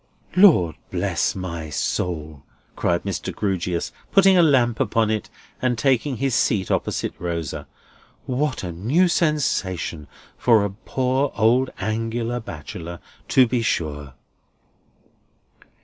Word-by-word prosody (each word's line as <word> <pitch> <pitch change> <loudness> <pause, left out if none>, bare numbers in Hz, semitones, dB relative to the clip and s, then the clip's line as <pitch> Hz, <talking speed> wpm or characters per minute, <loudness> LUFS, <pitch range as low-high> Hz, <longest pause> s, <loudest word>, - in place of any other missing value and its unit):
"Lord 160 - +5
bless - - 0
my 85 -4 -5
soul," 75 0 -3 0.3
cried 85 0 0
Mr. 100 -3 -3
Grewgious, 90 -4 -2 0.2
putting 195 -1 +6
the 180 - +6
lamp 125 -7 +3
upon 110 -1 +1
it, 110 -1 -2 0.3
and 125 -2 +1
taking 130 +2 +1
his 135 0 0
seat 100 -4 +1
opposite - - -1
Rosa; 85 -4 -4 0.6
"what 130 -1 -1
a 90 - -4
new 125 - +2
sensation 95 - 0 0.3
for 110 -4 +4
a 100 - -3
poor 130 +6 -1
old 125 +4 +3
Angular 115 +3 -2
bachelor, 85 -3 -8 0.3
to 130 - +5
be 120 0 0
sure!" 75 - -2
110 Hz, 115 wpm, -22 LUFS, 85-130 Hz, 0.6 s, putting